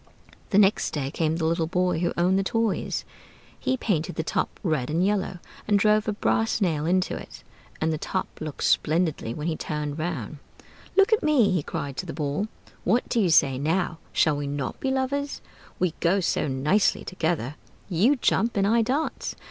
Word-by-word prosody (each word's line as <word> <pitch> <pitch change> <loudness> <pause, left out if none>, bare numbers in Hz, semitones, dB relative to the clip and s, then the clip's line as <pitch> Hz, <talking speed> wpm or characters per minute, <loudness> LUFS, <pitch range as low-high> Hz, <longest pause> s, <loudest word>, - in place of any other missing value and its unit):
The 200 - +2
next 205 -2 +3
day 140 -2 -2
came 160 0 0
the 165 -1 -1
little 165 0 +1
boy 180 -1 +1
who 175 - 0
owned 185 +3 +3
the - - +1
toys: 225 +1 -1 0.5
he 260 - 0
painted 180 -7 -1
the 160 - -1
Top - - -2
red 155 -9 0
and 165 +4 +1
yellow, 195 -2 0 0.3
and 205 -1 +4
drove 210 +1 +3
a - - +2
brass 225 +2 +1
nail 160 -6 0
into 185 +1 +1
it; - - -10 0.4
and 160 0 +1
the 155 - -3
Top 185 - -2 0.2
looked 155 -2 -5
splendidly 160 -7 +1
when 150 - -5
he 165 -1 0
turned 150 0 -4
round. 155 -5 -4 0.6
"Look 395 +3 +5
at 435 - +3
me!" 295 -9 +4
he 180 -4 +1
cried 140 -1 -5
to - - -4
the - - -5
Ball. 150 +6 -2 0.4
"What 230 +7 +1
do 240 - +1
you 185 - +2
say 135 -4 +4
now? 165 +2 0
Shall 155 - +3
we 145 0 -3
not 140 -2 -3
be 270 - -1
lovers? 275 +2 -1 0.4
We 180 -3 0
go 180 +4 +3
so 180 - 0
nicely 145 +10 +2
together? 160 -7 -1 0.3
You 205 - +3
jump 235 -3 +1
and 195 - +3
I 230 +3 +4
dance! 270 +8 -2
175 Hz, 190 wpm, -25 LUFS, 155-210 Hz, 0.6 s, Look